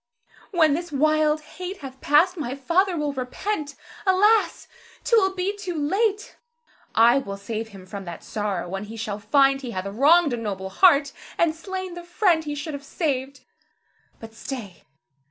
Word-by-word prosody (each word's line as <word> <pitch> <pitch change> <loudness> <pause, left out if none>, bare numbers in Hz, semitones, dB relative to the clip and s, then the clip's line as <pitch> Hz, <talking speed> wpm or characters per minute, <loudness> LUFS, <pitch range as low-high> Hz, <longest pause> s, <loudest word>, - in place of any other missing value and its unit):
When 320 -7 +3
this 340 +2 -3
wild 305 +1 +2
hate 365 +4 -8
hath 265 0 -10
passed, 325 +6 +4
my 275 -6 -4
father 340 +7 +1
will 295 -2 -1
repent. 285 +4 -4 0.3
Alas! 410 +3 +3 0.4
't 470 - +3
will 385 -3 +3
be 380 +2 -1
too 375 -4 -5
late. 400 +8 -1 0.6
I 235 +4 +6
will 200 -6 -6
save 220 +2 -5
him 195 -4 -13
from 195 +1 -8
that 170 -1 -8
sorrow 205 -5 -3
when 195 +3 -5
he 225 +2 -9
shall 210 -2 -4
find 270 +5 +3
he 255 - -6
hath 185 - -3
wronged 285 +9 +4
a - - -1
noble 195 -4 -4
heart, 285 - +5 0.3
and 335 -2 +3
slain 375 +2 -6
the 350 0 -8
friend 345 -2 +1
he 295 -1 -3
should 295 +1 -5
have 285 0 -6
saved. 275 -3 -3 0.8
But 225 -1 -11
stay! 225 - -8
290 Hz, 170 wpm, -24 LUFS, 225-350 Hz, 0.8 s, I